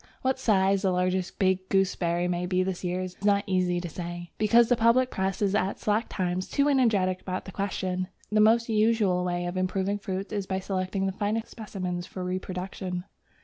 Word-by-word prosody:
What 260 0 +1
size 195 -4 +3
the 195 - +2
largest 180 0 0
big 190 0 +1
gooseberry 180 -2 +1
may 180 0 -1
be 185 0 +2
this 185 -1 -3
year 180 +1 -1
is 185 -1 -5
not 200 -1 +3
very 190 - -1
easy 180 -1 +1
to 175 - -4
say, 175 +1 -6
because 230 +2 +5
the 245 - +4
public 235 +3 +3
Press 190 +1 -1
is 200 -1 +2
at 200 -1 0
slack 215 +2 0
times 185 0 -2
too 280 0 +2
energetic 210 -10 +2
about 185 0 -4
the 190 - -8
question. 185 -2 -2 0.2
The 215 0 +4
most 230 +2 +4
usual 215 -5 +2
way 175 0 -1
of 175 +1 -3
improving 190 +2 0
fruits 195 +1 -4
is 200 -2 -2
by 190 - -1
selecting 190 0 -2
the 190 - 0
finest 210 +3 -2
specimens 185 -5 -5
for 185 - -6
reproduction. 185 0 -4
190 Hz, 195 wpm, -27 LUFS, 180-205 Hz, 0.2 s, because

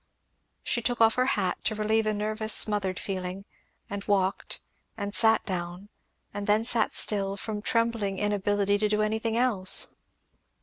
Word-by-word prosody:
She 240 - -1
took 240 +1 -2
off 225 -1 +5
her 255 0 0
hat, 185 -3 -2
to 220 - 0
relieve 215 +1 0
a 215 - 0
nervous 215 +1 0
smothered 200 -3 +2
feeling; 190 0 -5 0.4
and 200 0 -6
walked, 195 -1 -1 0.4
and 200 0 -5
sat 220 +3 +5
down; 180 +1 -6 0.4
and 205 0 -5
then 210 +2 +2
sat 235 0 0
still, 195 -1 0
from 210 0 -5
trembling 230 -3 -1
inability 205 0 0
to 210 0 0
do 210 0 0
anything 220 +1 -2
else. 220 -7 +3
210 Hz, 150 wpm, -26 LUFS, 195-220 Hz, 0.4 s, off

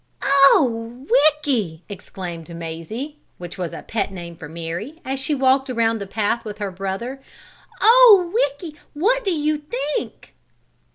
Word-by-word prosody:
"Oh, 255 -3 +3
Ricky!" 260 - +2
exclaimed 175 -4 -8
Mazie 170 - -6 0.2
(which 175 +1 -9
was 175 -3 -3
a - - -8
pet 220 -3 -2
name 170 -3 -8
for 160 -2 -10
Mary) 170 - -6
as 265 +1 -2
she 280 +3 -1
walked 265 0 +2
around 230 -2 +1
the 200 - -5
side 195 - -19
path 225 +2 -1
with 210 -1 -7
her 205 -2 -4
brother. 195 +8 -5 0.6
"Oh, 440 -7 +7
Ricky! 305 - -1 0.2
What 455 +9 +1
you 305 -4 0
think?" 280 -4 -5
245 Hz, 140 wpm, -21 LUFS, 190-295 Hz, 0.6 s, Oh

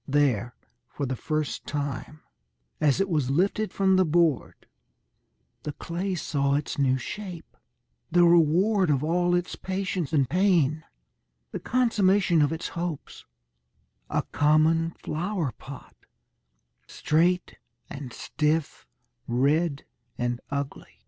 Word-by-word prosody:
There, 130 -5 +1 0.3
for 140 - -4
the 130 0 -2
first 155 +3 -3
time, 145 +1 -4 0.6
as 150 +2 +2
it 195 - +2
was 150 -8 0
lifted 195 +8 +1
from 190 -1 +2
the 185 - +5
board, 165 -2 +1 1.0
the 150 - -5
clay 180 +5 -3
saw 140 -4 0
its 145 0 -3
new 130 -2 +3
shape, 180 +4 -7 0.5
the 175 +1 +4
reward 175 +4 +4
of 140 -1 +2
all 175 +2 +2
its 175 0 -2
patience 185 -4 -3
and 140 -5 +2
pain, 160 -2 +2 0.7
the - - -4
consummation 200 -8 +2
of 145 - +2
its 160 - -4
hopes 170 -3 -6 0.8
a - - 0
common 155 +2 +3
flower 170 - -2
pot, 135 +2 -12 0.9
straight 175 +3 0 0.3
and 140 -3 -8
stiff, 150 +4 -2 0.4
red 140 +5 +1 0.3
and 120 0 -2
ugly. 140 0 -5
160 Hz, 115 wpm, -26 LUFS, 140-180 Hz, 1.0 s, the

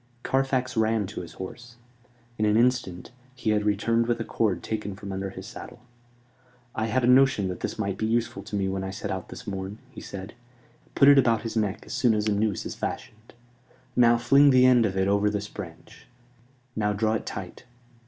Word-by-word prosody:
Carfax 130 -1 0
ran 110 -1 +1
to 100 0 -6
his 85 - -10
horse. 120 +6 -9 0.6
In - - +1
an 105 +1 +3
instant 120 -7 0 0.2
he 125 -4 -1
had 105 -1 +1
returned 115 +3 +1
with 120 -1 0
a - - -1
cord 110 -4 -1
taken 105 -3 -4
from 100 0 -8
under 95 0 -3
his 95 0 -9
saddle. 120 +1 -10 0.9
"I 110 0 -1
had 120 +3 0
a - - +3
notion 125 -6 +4
that 90 - -5
this - - -4
might 100 -3 -3
be 110 - 0
useful 115 -3 -1
to 105 0 -6
me 100 -1 0
when 95 0 -2
I 95 - -4
set 95 - -5
out - - -5
this - - -9
morn," 95 +1 -5
he - - -10
said. 95 +1 -8 0.6
"Put 140 - +5
it 140 -1 +8
about 115 -4 +2
his 115 -1 -5
neck 105 -1 -1
soon 120 -3 +2
as 105 0 -1
a - - +2
noose 105 -1 -1
is - - -4
fashioned. 110 +2 -7 0.6
Now 120 -1 +5
fling 140 +4 +5
the 130 -1 +6
end 125 -3 +5
of 95 -1 -4
it 95 0 +2
over 100 +1 +2
this 105 0 -3
branch. 85 -5 -11 0.7
Now 105 -1 0
draw 110 +2 0
it 110 - -3
tight. 95 +5 -7
110 Hz, 205 wpm, -26 LUFS, 100-120 Hz, 0.9 s, it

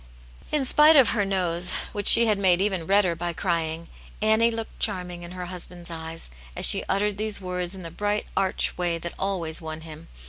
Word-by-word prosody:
'" - - -24
In 295 -3 0
spite 300 +4 +5
of 270 -4 +6
her 210 -3 0
nose, 180 -2 0 0.2
which 205 -1 -3
she 235 - +9
had 210 -3 +1
made 185 -3 +3
even 190 -4 -1
redder 195 -3 +2
by 170 +1 -4
crying, 165 -2 -3 0.3
Annie 220 +2 +2
looked 225 -1 -7
charming 180 -4 -3
in 175 +1 -10
her 180 -1 -6
husband's 175 -1 -9
eyes, 160 - -7 0.2
as - - +4
she - - +7
uttered 205 +1 -1
these 215 -1 -1
words 180 -1 -4
in 185 - -9
the 165 - -8
bright, 205 +4 -2
arch 190 -1 -1
way 175 -1 -1
that 170 +1 -7
always 175 -5 -2
won 160 0 -7
him. 160 0 -12
180 Hz, 205 wpm, -24 LUFS, 170-205 Hz, 0.3 s, she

